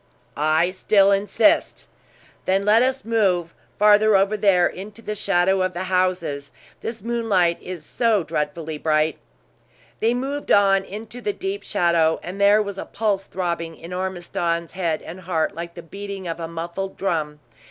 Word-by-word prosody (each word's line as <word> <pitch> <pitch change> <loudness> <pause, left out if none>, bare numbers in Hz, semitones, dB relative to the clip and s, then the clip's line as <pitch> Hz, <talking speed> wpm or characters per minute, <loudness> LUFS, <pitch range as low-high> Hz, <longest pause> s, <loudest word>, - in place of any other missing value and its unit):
"I 155 +4 +2
still 195 +1 +3
insist!" 200 +1 +2 0.6
"Then 195 +1 +1
let 215 +2 +5
us 260 0 0
move 190 -7 +1 0.2
farther 210 0 +5
over 195 +2 +3
here 195 -4 +4
into 205 +6 -6
the 210 - -3
shadow 190 -2 +2
of 185 0 0
the 175 +2 -3
houses; 180 -6 -1 0.3
this 225 -2 -6
moonlight 220 -8 +1
is 180 -4 -7
so 225 -6 +1
dreadfully 150 0 -3
bright!" 155 -1 +1 0.8
They 230 +2 +2
moved 275 +3 -3
on 195 -1 +5
into 220 +5 -8
the 415 - -1
deep 390 +1 -4
shadow, 170 -5 +2
and 185 +3 -6
there 205 +1 +5
was 200 -1 -6
a - - -5
pulse 200 -3 -1
throbbing 170 -3 -3
in 170 +2 -9
Ormiston's 175 -2 -2
head 170 -4 -2
and 175 +3 -8
heart 170 -3 -1
like 170 0 -7
the 170 - -9
beating 195 +1 -7
of 165 0 -4
a 165 - -4
muffed 170 +4 -5
drum. 155 -6 -2
190 Hz, 160 wpm, -22 LUFS, 170-210 Hz, 0.8 s, let